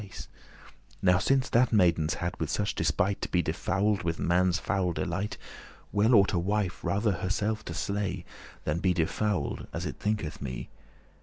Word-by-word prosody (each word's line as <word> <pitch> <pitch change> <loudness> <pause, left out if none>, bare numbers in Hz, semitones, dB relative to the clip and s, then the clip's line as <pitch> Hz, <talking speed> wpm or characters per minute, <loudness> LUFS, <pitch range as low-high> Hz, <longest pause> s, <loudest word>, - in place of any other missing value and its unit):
*same 100 - -10 0.9
Now 90 -1 +5
since 130 +5 +2
that 120 +1 +4
maidens 85 -7 +3
hadde 85 -3 -3
such 100 +4 0
despite 100 0 0
To - - -3
be 90 -1 +2
defouled 95 +5 0
with 85 -2 -1
man's 90 0 +2
foul 95 -2 0
delight, 95 +4 -2 0.5
Well 110 +4 +4
ought 100 0 +5
a 90 - +2
wife 100 0 -1
rather 100 +5 +1
herself 100 +4 -1
to 85 - -5
sle,* - - -7 0.2
*slay 100 -2 -2 0.4
Than 75 +2 -1
be 90 0 +2
defouled, 90 0 -1
as - - -4
it - - -4
thinketh 105 -8 -2
me. 65 -2 -5
95 Hz, 165 wpm, -29 LUFS, 85-105 Hz, 0.9 s, Now